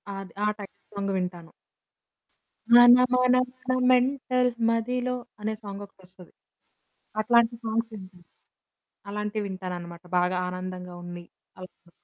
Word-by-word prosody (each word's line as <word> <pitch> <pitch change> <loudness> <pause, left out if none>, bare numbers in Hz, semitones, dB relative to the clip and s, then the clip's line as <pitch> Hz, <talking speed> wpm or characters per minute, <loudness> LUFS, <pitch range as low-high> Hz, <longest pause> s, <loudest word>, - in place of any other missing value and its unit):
అది. 195 -3 -8
ఆ - - +3
title 200 -2 -11 0.2
song 200 0 -2
వింటాను. 175 -2 -4 1.2
మన 240 0 +10 0.2
మన 250 0 +4 0.3
మన 255 - +3 0.2
మెంటల్ 255 0 +2 0.2
మదిలో 250 +2 0 0.3
అనే 215 +1 -1
సాంగొకటొస్తది. 195 -3 -11 0.9
అట్లాంటి 235 +1 +4
సాంగ్స్ 225 +1 -1
వింటా. 185 -3 -11 0.9
అలాంటివి 210 +1 -3
వింటాననమాట 180 -2 -7
బాగా 180 +1 +1
ఆనందంగా 180 0 -6
ఉంది. 175 0 -8 0.3
అవును. 185 -1 -13
200 Hz, 105 wpm, -26 LUFS, 180-235 Hz, 1.2 s, మన